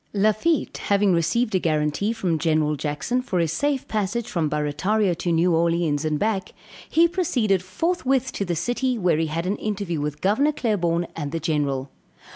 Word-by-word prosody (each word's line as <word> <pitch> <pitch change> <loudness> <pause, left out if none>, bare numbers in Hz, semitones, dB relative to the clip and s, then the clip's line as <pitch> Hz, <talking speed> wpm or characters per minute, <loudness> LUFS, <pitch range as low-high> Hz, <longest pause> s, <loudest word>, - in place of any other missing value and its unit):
Lafitte 215 +10 +1
having 200 -1 +3
received 190 +8 +1
a 185 - +3
guarantee 155 +5 0
from 185 -8 -1
General 155 -2 +1
Jackson 150 - -2
for 195 -7 -3
his 165 -3 +1
safe 285 - -1
passage 215 +2 -2
from 165 -8 -1
Barrataria 175 +7 0
to 175 - -1
New 170 +2 +3
Orleans 165 -2 +1
and 155 -1 0
back, 205 +1 -1 0.4
he 330 +2 +5
proceeded 265 - +1
forthwith 265 - 0
to - - -3
the 175 -3 -2
city 245 +8 -1
where 180 -6 +2
he 160 - 0
had 165 +3 -3
an 195 +3 -1
interview 195 -7 -3
with 150 0 -3
Gov. 275 - +2
Claiborne 175 - 0
and 145 -3 -4
the 165 - -2
General. 145 -4 -1
185 Hz, 175 wpm, -23 LUFS, 160-220 Hz, 0.4 s, he